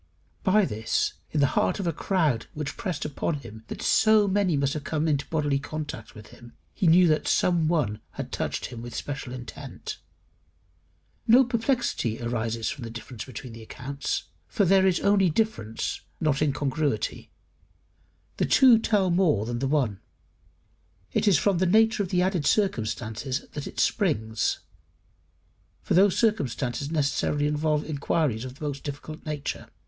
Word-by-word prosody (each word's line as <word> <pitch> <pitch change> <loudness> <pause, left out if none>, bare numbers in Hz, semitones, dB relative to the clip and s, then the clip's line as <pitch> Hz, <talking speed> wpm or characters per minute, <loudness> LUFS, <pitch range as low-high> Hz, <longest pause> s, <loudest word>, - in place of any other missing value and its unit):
By 205 +2 +4
this, 110 -6 -1 0.2
in 150 - 0
the - - +6
heart - - +1
of 195 - -2
a 170 - 0
crowd 155 - 0
which 150 -2 -4
pressed 180 -7 -3
upon 150 +2 -2
him 115 -6 -10 0.2
so 215 -1 +5
that 195 - -1
many 190 -6 +2
must 140 0 +1
have 150 - -4
come 155 +1 -1
into 145 -3 0
bodily 145 -3 0
contact 145 -6 -6
with 105 0 -12
him, 120 0 -14 0.2
he 185 - 0
knew 175 +2 +6
that 155 -1 +1
some 170 -3 +2
one 135 -11 0
had - - -6
touched - - -2
him 115 -2 -7
with 120 -1 -8
special 135 -3 -5
intent. 125 -1 -8 1.3
No 245 +4 +7
perplexity 235 - 0
arises 115 -1 -2
from 135 - -4
the 115 - -5
difference 115 +1 -8
between 125 -1 -8
the 115 - -10
accounts, 135 +5 -4 0.2
for 205 -5 +1
there 190 +1 +5
is 180 -3 +2
only 200 -2 +4
difference, 150 - -2 0.2
not 150 -3 +1
incongruity: 145 0 -1 1.1
the - - +2
two 250 -4 +7
tell 205 -5 +2
more 170 - +2
than 120 +1 -3
the 135 - 0
one; 130 -9 0 1.1
it - - +1
is 195 -6 +6
from 195 +2 +2
the 185 - +2
nature 220 +3 +4
of 190 - -2
the 180 -1 +2
added 180 -6 0
circumstances 120 - -1
that 145 - -5
it - - -7
springs, 110 - 0 1.2
for - - -1
those 190 +1 +5
circumstances 140 - 0
necessarily 145 -1 0
involve 150 0 +1
inquiries 140 -5 -1
of 130 0 -8
the 150 - -7
most 140 -2 -4
difficult 150 +2 -7
nature. 150 -2 -4
150 Hz, 160 wpm, -26 LUFS, 125-185 Hz, 1.3 s, No